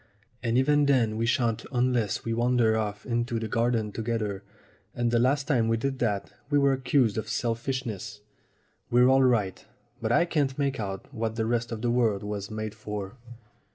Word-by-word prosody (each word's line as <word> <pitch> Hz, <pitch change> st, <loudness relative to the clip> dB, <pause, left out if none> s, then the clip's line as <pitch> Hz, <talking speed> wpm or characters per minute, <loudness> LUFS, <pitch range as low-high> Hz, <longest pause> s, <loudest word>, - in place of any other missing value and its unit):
And 115 Hz, 0 st, +1 dB
even 145 Hz, +2 st, +3 dB
then 120 Hz, -6 st, +3 dB
we 115 Hz, +1 st, 0 dB
shan't 115 Hz, -2 st, +1 dB
unless 125 Hz, -5 st, 0 dB
we 115 Hz, -, -1 dB
wander 120 Hz, -1 st, +2 dB
off 105 Hz, -2 st, -3 dB
into 120 Hz, -1 st, -1 dB
the 110 Hz, -1 st, -3 dB
garden 115 Hz, -1 st, 0 dB
together, 110 Hz, -3 st, -3 dB, 0.5 s
and 120 Hz, -1 st, 0 dB
the 120 Hz, -, +3 dB
last 140 Hz, +3 st, +2 dB
time 120 Hz, -7 st, +2 dB
we 115 Hz, 0 st, +2 dB
did 135 Hz, +3 st, -2 dB
that 105 Hz, -4 st, -1 dB, 0.2 s
we 145 Hz, -, +3 dB
were 140 Hz, -1 st, +4 dB
accused 130 Hz, -4 st, +2 dB
of 110 Hz, -, -6 dB
selfishness. 115 Hz, -3 st, -3 dB, 0.7 s
We're 125 Hz, +1 st, +5 dB
all 135 Hz, 0 st, +5 dB
right, 115 Hz, -7 st, +1 dB, 0.4 s
but -, -, -1 dB
I 175 Hz, -, +4 dB
can't 145 Hz, -6 st, 0 dB
make 140 Hz, -3 st, -1 dB
out 95 Hz, -2 st, -5 dB
what 110 Hz, 0 st, -2 dB
the 110 Hz, -1 st, -1 dB
rest 120 Hz, +1 st, -1 dB
of 110 Hz, 0 st, -5 dB
the 120 Hz, -, +2 dB
world 115 Hz, -5 st, +1 dB
was 105 Hz, -1 st, -4 dB
made 110 Hz, -1 st, -4 dB
for." 105 Hz, -1 st, -6 dB
115 Hz, 185 wpm, -27 LUFS, 110-125 Hz, 0.7 s, We're